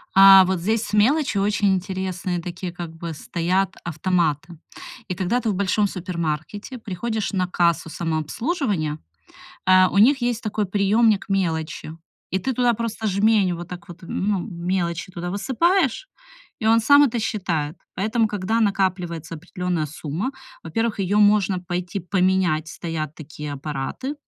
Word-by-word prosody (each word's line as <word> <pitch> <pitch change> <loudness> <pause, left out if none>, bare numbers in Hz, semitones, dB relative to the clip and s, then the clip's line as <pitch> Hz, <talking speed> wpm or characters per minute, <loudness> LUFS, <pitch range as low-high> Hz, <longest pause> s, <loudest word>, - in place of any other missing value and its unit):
А 195 0 +10
вот 185 -1 0
здесь 220 +5 0
с - - -7
мелочью 230 +1 +3
очень 205 -1 +2
интересные 185 -1 -2
такие 175 +1 -6
как 170 -2 -7
бы 165 0 -6
стоят 180 +5 -1
автоматы. 170 -1 -1 0.5
И 180 - -3
когда 190 +7 0
ты 230 - -1
в 200 - 0
большом 200 +2 +1
супермаркете 180 - -4
приходишь 220 0 -3
на 185 -2 0
кассу 170 -2 +1
самообслуживания, 165 - -2 0.7
э, 185 0 +6
у 200 - -2
них 260 +6 +5
есть 240 -2 -1
такой 215 -1 -1
приёмник 205 +2 +2
мелочи, 160 -4 -2 0.3
и 190 - 0
ты 265 +6 -2
туда 245 0 +2
просто 225 -1 -3
жмень, 200 -1 +3
вот 175 0 -7
так 180 +3 -9
вот 175 -1 -11
ну 195 +3 -1
мелочи 175 -1 -3
туда 175 -1 -5
высыпаешь, 295 - +1 0.5
и 220 - 0
он 225 +1 +5
сам 285 +5 +7
это 240 -4 +1
считает. 170 -8 -2 0.2
Поэтому, 220 +4 +1
когда 210 +2 -1
накапливается 180 -6 -1
определённая 180 -1 -3
сумма, 155 - -4 0.3
во-первых, 225 -2 -2
её 195 +2 +1
можно 205 -2 +4
пойти 180 +1 -4
поменять, 180 -3 +1
стоят 155 -2 -5
такие 150 -1 -7
аппараты, 145 - -4
190 Hz, 145 wpm, -23 LUFS, 170-215 Hz, 0.7 s, А